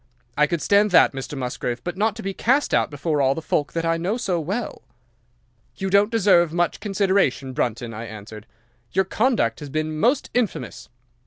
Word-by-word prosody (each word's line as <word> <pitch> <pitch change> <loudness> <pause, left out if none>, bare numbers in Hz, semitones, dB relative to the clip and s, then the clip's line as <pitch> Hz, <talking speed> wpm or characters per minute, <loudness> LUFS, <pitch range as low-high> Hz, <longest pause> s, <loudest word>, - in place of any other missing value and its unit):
I 150 0 +3
could 170 -2 -2
stand 205 +1 +4
that, 180 - +5
Mr. 135 +2 -6
Musgrave, 125 -1 -4
but 175 0 -4
not 210 +2 0
to 225 - -8
be 195 0 -3
cast 265 +9 +1
out - - +2
before 150 +1 -1
all 135 0 +2
the - - -3
folk 145 -2 -1
that 165 0 -2
I 165 0 +1
know 185 +7 -1
so 190 -8 -1
well." 200 +9 -4 0.9
"'"You 190 0 -3
don't 200 +2 +4
deserve 185 -7 +3
much 175 0 0
consideration, 190 - 0
Brunton," 120 -1 -2
I 115 +2 -6
answered. 110 -1 -10 0.5
"Your 190 +1 +2
conduct 215 - +1
has 145 - -8
been 155 +1 -3
most 255 - +1
infamous. 245 -4 -2
170 Hz, 185 wpm, -23 LUFS, 135-200 Hz, 0.9 s, that